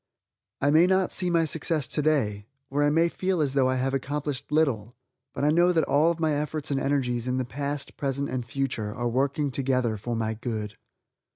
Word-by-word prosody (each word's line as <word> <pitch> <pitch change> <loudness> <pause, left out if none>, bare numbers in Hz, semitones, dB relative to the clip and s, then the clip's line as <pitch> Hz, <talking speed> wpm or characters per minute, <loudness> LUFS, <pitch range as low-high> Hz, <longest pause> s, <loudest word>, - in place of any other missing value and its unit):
I 145 - +3
may 165 +4 +6
not 190 0 +2
see 180 -1 +1
my 165 -1 +3
success 155 -2 -1
today, 130 -10 0 0.2
or 145 +1 +1
I 145 - +4
may 165 +3 +3
feel 185 +1 -1
as 140 -3 +1
though 135 -2 +3
I 130 - +1
have 130 +1 -1
accomplished 140 +1 -3
little, 125 -8 +1 0.4
but - - -4
I 150 - +4
know 175 +3 +4
that 165 -3 +2
all 155 +5 +3
my 160 -2 +1
efforts 150 0 -2
and 135 - +1
energies, 125 -4 0
in 125 0 0
the 130 - -1
past, 140 +3 -4
present 140 0 -1
and 125 -1 -3
future, 115 -3 -3
are 120 0 -1
working 140 +4 0
together 125 -4 0
for 120 +4 -4
my 110 -1 -1
good. 110 -2 -4
140 Hz, 200 wpm, -26 LUFS, 125-155 Hz, 0.4 s, may